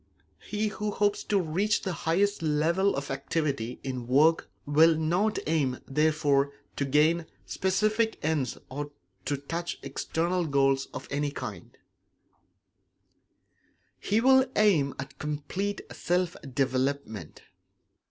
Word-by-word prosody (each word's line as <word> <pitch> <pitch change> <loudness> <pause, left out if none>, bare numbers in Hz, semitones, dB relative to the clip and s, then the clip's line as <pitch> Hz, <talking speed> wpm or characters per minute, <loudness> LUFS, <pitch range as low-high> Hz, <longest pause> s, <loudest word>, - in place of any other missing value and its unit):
He 215 +1 -2
who 210 0 -3
hopes 205 0 0
to 205 - +2
reach 190 +5 0
the 190 - -2
highest 195 +5 +1
level 165 +5 +2
of 140 0 -4
activity 135 -3 -2
in 130 -3 -4
work 150 +6 +4 0.2
will 155 +2 +5
not 175 +7 +1
aim, 145 -5 +1
therefore, 145 -1 +2 0.2
to 140 - 0
gain 155 +4 +3 0.2
specific 215 +4 +1
ends 150 -6 0
or 145 +2 -4 0.4
to 145 - 0
touch 165 +5 -4
external 170 +1 -1
goals 135 -1 +2
of - - -7
any 145 +1 0
kind; 145 - -8 2.2
he 210 +2 +1
will 260 +2 +5
aim 170 -10 +3
at 135 0 -8
complete 155 +7 -3
self 180 0 0 0.2
development. 130 - -2
155 Hz, 115 wpm, -28 LUFS, 140-190 Hz, 2.2 s, will